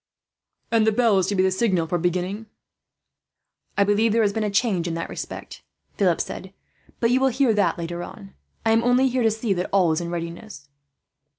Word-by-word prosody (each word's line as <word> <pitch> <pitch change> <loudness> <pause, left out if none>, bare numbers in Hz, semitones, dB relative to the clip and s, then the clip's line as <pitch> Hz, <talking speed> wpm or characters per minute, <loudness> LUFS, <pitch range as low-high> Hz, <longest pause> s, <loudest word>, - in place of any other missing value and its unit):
"And 225 -1 +3
the - - +5
bell 220 -3 +3
is 185 - 0
to 205 - -1
be 185 - +3
the 190 - +2
signal 185 -4 +1
for 175 +2 -1
beginning?" 180 +5 -2 1.3
"I 200 - +5
believe 205 +3 +2
there 230 0 +3
has 200 -1 +1
been 220 - -1
a 210 - 0
change 200 -4 0
in 165 - -3
that 165 - -5
respect," - - -7 0.3
Philip 180 -4 +1
said; 190 +1 -6 0.4
"but 230 0 +2
you 255 - +3
will 265 - +3
hear 260 -2 +2
that 195 -5 +1
later 170 0 -5
on. 195 +2 -10 0.3
I 225 - +3
am 225 +1 +3
only 250 +2 +3
here 255 0 0
to 225 - +4
see 220 -1 -1
that 180 0 -3
all 185 -4 +3
is 160 +2 0
in 170 - -4
readiness." 170 -1 -7
200 Hz, 210 wpm, -23 LUFS, 175-225 Hz, 1.3 s, the